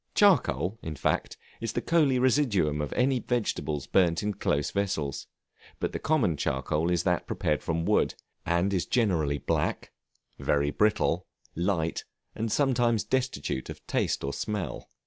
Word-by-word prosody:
Charcoal, 165 - +3
in 80 -1 -5
fact, - - -1 0.2
is 115 -2 -3
the - - -1
coaly 155 -6 +3
residuum 115 - +2
of 75 - -3
any 130 +1 +2
vegetables 105 - -2
burnt 85 -1 +2
in 105 0 0
close 75 -6 0
vessels; 95 -9 -2 0.5
but - - -1
the - - -4
common 120 - +1
charcoal 75 +5 0
is 90 -1 +1
that - - 0
prepared 75 -1 0
from 80 0 -1
wood, - - +2 0.3
and 85 +4 +1
is 90 - 0
generally 85 - +1
black, - - -1 0.5
very 70 0 +1
brittle, 105 +5 +1 0.3
light, 85 -2 -1 0.3
and 115 +1 -2 0.6
destitute 130 - -1
of - - -9
taste - - 0
or 70 +1 -2
smell. 105 0 -4
90 Hz, 145 wpm, -28 LUFS, 75-115 Hz, 0.6 s, Charcoal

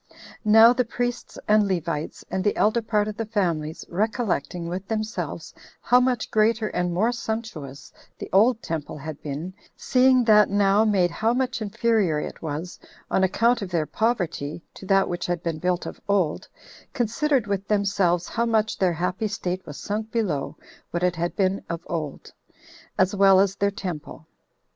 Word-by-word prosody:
Now 225 +2 +7
the 250 0 +1
priests 245 +1 -4
and 210 -1 +4
Levites, 165 -4 -3
and 190 - -1
the 205 - +1
elder 220 +3 +2
part 215 -2 0
of 215 - -5
the 225 - -2
families, 170 -8 -2
recollecting 185 - -2
with 180 +3 -5
themselves 220 0 -4 0.3
how 245 - +4
much 250 -2 0
greater 220 0 +2
and 180 0 -1
more 210 +7 +1
sumptuous 220 - -6 0.2
the - - -7
old 220 +4 +4
temple 155 -2 -4
had 150 0 -7
been, 155 +6 -5 0.2
seeing 255 0 +4
that 210 -2 +5
now 200 +1 +3
made 190 -5 +2
how 225 +6 0
much 255 -2 -1
inferior 210 -6 +1
it - - -6
was, 160 +3 -5 0.3
on 190 - +2
account 230 +5 +2
of 195 - -4
their 170 -3 0
poverty, 175 -8 -2
to 190 - -11
that 195 -1 +3
which 175 0 -3
had 175 -1 -2
been 165 -2 -2
built 180 +1 -1
of - - -8
old, 190 -7 0 0.5
considered 255 +2 +1
with 200 -1 -3
themselves 195 -4 +1
how 235 +1 -1
much 220 -1 +1
their 185 -2 +2
happy 180 +5 -2
state 185 -3 -3
was 145 - -8
sunk 215 +2 -4
below 185 -12 -2 0.3
what 175 +1 -3
it 180 -1 +2
had 170 +1 -2
been 195 -1 0
of 170 0 -4
old, 155 -4 -5 0.6
as 185 +1 +2
well 195 -1 +6
as 195 0 +2
their 200 0 +1
temple. 175 -6 -7
195 Hz, 170 wpm, -24 LUFS, 175-220 Hz, 0.6 s, Now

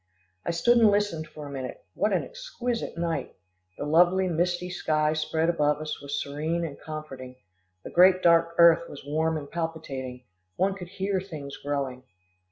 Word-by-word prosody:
I - - +1
stood 235 +9 +4
and 225 -2 +7
listened 200 -6 0
for 150 -1 -10
a 140 - -8
minute. 130 -2 -6
What - - +1
an - - +1
exquisite 365 - -4
night! 165 -5 -2 0.4
The - - -4
lovely 175 +5 +4
misty 180 +1 0
sky 155 -3 +1
spread 160 +1 0
above 150 -3 +2
us 155 -1 -5
was 140 0 -3
serene 155 +4 -2
and 145 -4 -7
comforting, 150 -5 -8 0.5
the - - -8
great 185 +1 +6
dark 170 0 +4
earth 170 0 +6
was 140 - -10
warm 160 +2 0
and 145 -2 -6
palpitating 140 -6 -5 0.3
one 195 - +1
could 185 -2 -8
hear 190 0 -1
things 150 -7 -8
growing. 140 -3 -3
160 Hz, 170 wpm, -27 LUFS, 145-180 Hz, 0.5 s, and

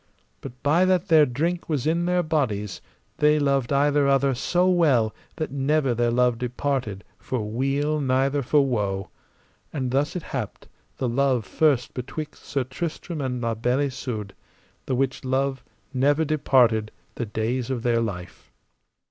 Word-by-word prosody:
But 125 +1 -10
by 155 +5 +4
that 185 -1 +1
their 155 -2 +6
drink 165 +9 -2
was 145 -6 -1
in 170 +2 +1
their 180 0 +2
bodies, 110 - -1 0.4
they 150 0 +4
loved 140 -3 +1
either 145 0 +3
other 135 0 +3
so 175 +8 +1
well 145 -12 +3 0.2
that 155 - -3
never 140 -1 +1
their 120 0 +1
love 120 -1 +2
departed 125 -5 -2 0.2
for 130 -3 -3
weal 135 +7 0
neither 135 +1 +1
for 140 +2 +3
woe. 100 -6 -2 0.6
And 130 -5 -2
thus 140 +5 0
it 180 - -3
happed 125 -7 -5 0.3
the 130 - -1
love 125 -1 +1
first 145 -6 +1
betwixt 150 +5 -6
Sir 140 -2 -1
Tristram 155 +4 -5
and 125 -2 -2
La 115 -1 0
Beale 125 +4 0
Isoud, 125 -7 -4 0.5
the 130 - 0
which 135 +1 -1
love 135 +1 -1 0.3
never 145 +4 +2
departed 125 -7 +3 0.2
the 120 - -4
days 115 +4 -2
of 125 -3 -2
their 115 -1 +2
life. 90 -6 -6
135 Hz, 155 wpm, -24 LUFS, 120-145 Hz, 0.6 s, their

